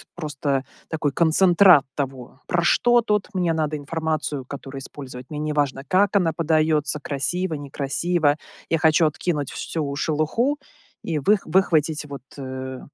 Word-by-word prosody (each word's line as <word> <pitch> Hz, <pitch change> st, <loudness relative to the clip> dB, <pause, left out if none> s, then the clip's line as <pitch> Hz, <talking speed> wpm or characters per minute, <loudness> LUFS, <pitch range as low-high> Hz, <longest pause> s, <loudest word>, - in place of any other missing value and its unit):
просто 145 Hz, -4 st, -2 dB, 0.3 s
такой 155 Hz, -3 st, -1 dB
концентрат 170 Hz, +1 st, +5 dB
того, 135 Hz, -2 st, -5 dB
про 175 Hz, -1 st, +1 dB
что 240 Hz, +7 st, +4 dB
тут 210 Hz, -3 st, 0 dB
мне 180 Hz, -3 st, +1 dB
надо 155 Hz, -1 st, -1 dB
информацию, 155 Hz, -2 st, -3 dB
которую 135 Hz, 0 st, -8 dB
использовать, 130 Hz, -2 st, -9 dB
мне 150 Hz, -, -5 dB
не 150 Hz, 0 st, -2 dB
важно, 145 Hz, -3 st, 0 dB
как 200 Hz, +5 st, +2 dB
она 175 Hz, -5 st, +3 dB
подается: 155 Hz, -3 st, +1 dB
красиво, 165 Hz, +6 st, -1 dB
некрасиво, 145 Hz, +3 st, 0 dB, 0.4 s
я 165 Hz, -, +2 dB
хочу 160 Hz, 0 st, +4 dB
откинуть 150 Hz, -3 st, -2 dB
всю 145 Hz, -4 st, -3 dB
шелуху 155 Hz, -, 0 dB, 0.5 s
и 160 Hz, -3 st, 0 dB
вых 200 Hz, +8 st, +2 dB
выхватить 160 Hz, -4 st, +2 dB
вот, 140 Hz, -1 st, -8 dB, 0.2 s
э, 130 Hz, -1 st, -6 dB
155 Hz, 140 wpm, -23 LUFS, 140-170 Hz, 0.5 s, концентрат